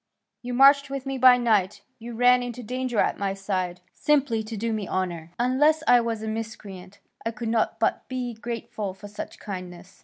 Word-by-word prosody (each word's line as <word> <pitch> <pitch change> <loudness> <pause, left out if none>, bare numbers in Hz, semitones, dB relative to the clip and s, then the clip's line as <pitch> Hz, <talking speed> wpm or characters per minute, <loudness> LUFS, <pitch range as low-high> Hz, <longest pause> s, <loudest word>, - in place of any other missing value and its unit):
You 245 0 -4
marched 280 +2 +6
with 275 -1 -5
me 270 -1 -3
by 250 0 +8
night, 215 -6 +1 0.2
you 235 +1 -8
ran 250 +1 +5
into 245 0 -6
danger 255 +1 -3
at - - +1
my 195 -1 -1
side, 185 -3 -3
simply 275 -7 +1
to 220 0 -7
do 225 +2 -1
me 210 -3 -3
honour. 175 -3 -3
Unless 295 +6 +3
I 245 -1 +6
were 230 0 -1
a 220 0 -6
miscreant, 205 -4 -7 0.3
I 225 - -1
could 230 0 -5
not 225 -1 0
but - - 0
be 250 -2 -4
grateful 220 -4 -5
for 205 +1 -11
such 205 - -8
kindness. 185 -1 -9
225 Hz, 190 wpm, -25 LUFS, 200-250 Hz, 0.3 s, by